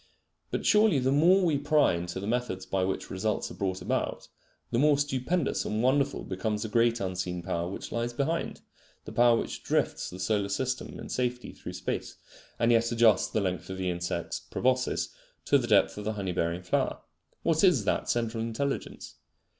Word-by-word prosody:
But - - -3
surely 210 -6 +5
the 130 0 +1
more 180 +7 +5
we 150 -5 +2
pry 150 - +3
into 85 +2 -4
the 100 - -5
methods 110 -5 -2
by 95 0 0
which 95 +1 -3
results 100 +3 -1
are - - -7
brougt 95 -1 -3
about, - - -2 0.4
the 115 - +1
more 145 +1 +5
stupendous 145 +3 0
and 110 +2 -1
wonderful 140 +2 +2
becomes 105 +3 -2
the 110 - -4
great 115 +1 +3
unseen 90 -2 -3
power 85 -1 -2
which 95 - -7
lies 120 +1 -1
behind, 145 +7 -2 0.4
the - - -7
power 120 -1 +5
which - - -4
drifts - - 0
the 90 - -9
solar 100 +1 0
system 130 +5 -2
in - - -7
safety 125 -1 -2
through - - -9
space, - - -4 0.4
and 115 0 +3
yet 115 0 +3
adjusts 115 -4 +4
the 110 - -1
length 90 -1 -2
of 95 - -5
the 95 -1 -1
insects 85 0 -3
proboscis 130 0 0 0.4
to 140 - +4
the 120 - -3
depth 105 -3 +4
of 105 - -6
the 110 - -1
honey 100 -3 -3
bearing 85 +1 -1
flower. 90 - 0 0.4
What 160 +1 +2
is 150 - +4
that - - 0
central 115 -1 0
intelligence? 125 +5 -4
115 Hz, 185 wpm, -28 LUFS, 95-130 Hz, 0.4 s, surely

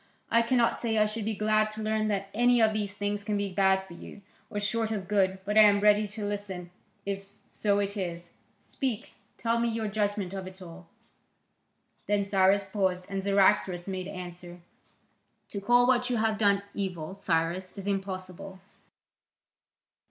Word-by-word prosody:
I 230 +1 +5
cannot 235 0 +2
say 225 -2 -1
I 215 - +5
should 215 0 -3
be 220 0 -1
glad 215 +1 +2
to 215 0 -5
learn 215 0 0
that 200 -1 -2
any 245 +2 +4
of 220 -1 +4
these 205 -2 -2
things 205 0 -2
can 205 0 -1
be 200 -2 -2
bad 190 0 +3
for 175 - -12
you, 200 +3 -11 0.3
or 205 - -3
short 220 +2 -1
of 200 -4 -3
good, 190 -2 +2
but 210 +2 +3
I - - +10
am 205 -1 +6
ready 210 0 +4
to 205 +1 -6
listen, 195 -4 -5 0.3
if 195 0 -4 0.2
so 200 -1 0
it 200 0 -1
is. 175 -3 -5 0.3
Speak, 255 -4 -3 0.2
tell 230 0 0
me 235 - +1
your 225 -1 -2
judgment 205 -2 -1
of 190 -1 -5
it 185 0 -11
all." 175 -1 -11 1.2
Then 205 -1 +1
Cyrus 195 0 +3
paused, 190 -1 -1
and 195 0 -2
Cyaxares 190 -2 +2
made 185 -1 -4
answer: 180 -2 -8 0.9
"To 200 - -5
call 245 +4 +4
what 250 0 +2
you 245 - +1
have 220 -1 0
done 200 -2 +3
evil, 185 -4 -4
Cyrus, 180 -1 -1
is 195 -2 -8
impossible. 190 -1 -4
200 Hz, 175 wpm, -28 LUFS, 190-215 Hz, 1.2 s, I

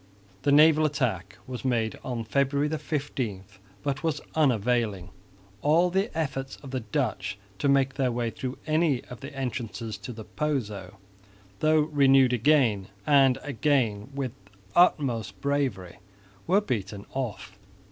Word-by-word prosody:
The 145 - +2
naval 155 +1 +6
attack 125 - -1
was 125 -1 -6
made 115 -4 0
on 120 -3 -3
February 140 +5 +1
15, 140 -10 -3 0.4
but 140 0 -2
was 160 -2 -1
unavailing. 115 - +1 0.5
All 170 +4 +3
the 195 +4 +1
efforts 135 -4 -2
of 135 - -8
the 130 - -1
Dutch 105 -4 -2 0.2
to 140 - +1
make 135 -1 +3
their 135 -2 0
way 120 -1 -1
through 130 +2 -5
any 155 -4 +2
of 125 - -8
the 140 +2 -8
entrances 115 -4 -4
to 105 - -7
the 110 -2 -8
Pozo, 105 -12 -3 0.6
though 155 0 +4
renewed 135 -4 +4
again 120 -6 +3 0.2
and 135 -3 +5
again 130 -6 0
with 135 -3 -2
the 100 - -23 0.2
utmost 120 - +2
bravery, 130 -12 -2 0.5
were 190 +4 +4
beaten 105 - -4
off. 125 -6 -4
130 Hz, 135 wpm, -27 LUFS, 110-145 Hz, 0.6 s, naval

